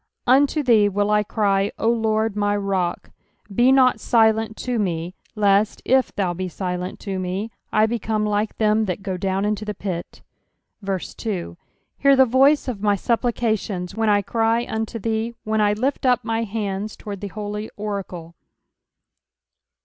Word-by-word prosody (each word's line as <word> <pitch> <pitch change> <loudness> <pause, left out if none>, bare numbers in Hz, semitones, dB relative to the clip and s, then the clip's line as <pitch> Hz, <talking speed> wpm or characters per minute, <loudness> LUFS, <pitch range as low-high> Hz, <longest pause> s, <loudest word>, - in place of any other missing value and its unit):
UNTO 285 +4 +3
thee 220 -5 +4
will 205 +1 0
I 210 0 +4
cry, 200 -1 0
O - - -1
Lord 220 -2 +1
my 205 0 +1
rock; 195 -3 -2 0.4
be 245 +6 +4
not 260 -2 +4
silent 220 -2 +2
to 245 -2 -2
me, 175 -3 -2 0.2
lest, 205 0 +2
i/thou 205 -8 +2
be 185 +2 -4
silent 180 0 -4
to 195 -2 -4
me, 185 +5 -3 0.2
I 215 - +4
become 220 -1 -1
like 210 +1 -1
them 215 0 +2
that 190 0 -4
go 190 -2 -3
down 190 +1 -1
into 210 0 -1
the 210 -1 -4
pit. 180 -4 -6 0.6
2 190 - -4 0.4
Hear 275 0 +5
the 265 0 +6
voice 270 +5 +4
of 230 -6 -4
my 205 -1 +3
supplications, 220 -4 -1
when 225 -1 0
I 205 -1 +3
cry 230 +2 +1
unto 220 +1 -3
thee, 225 +2 -2
when 215 0 0
I 205 0 +3
lift 260 +5 -1
up 245 -2 +2
my 225 0 -1
hands 205 -1 -3
toward 200 -2 -8
thy 205 - -4
holy 210 +1 -5
oracle. 195 -5 -5
210 Hz, 155 wpm, -22 LUFS, 195-225 Hz, 0.6 s, the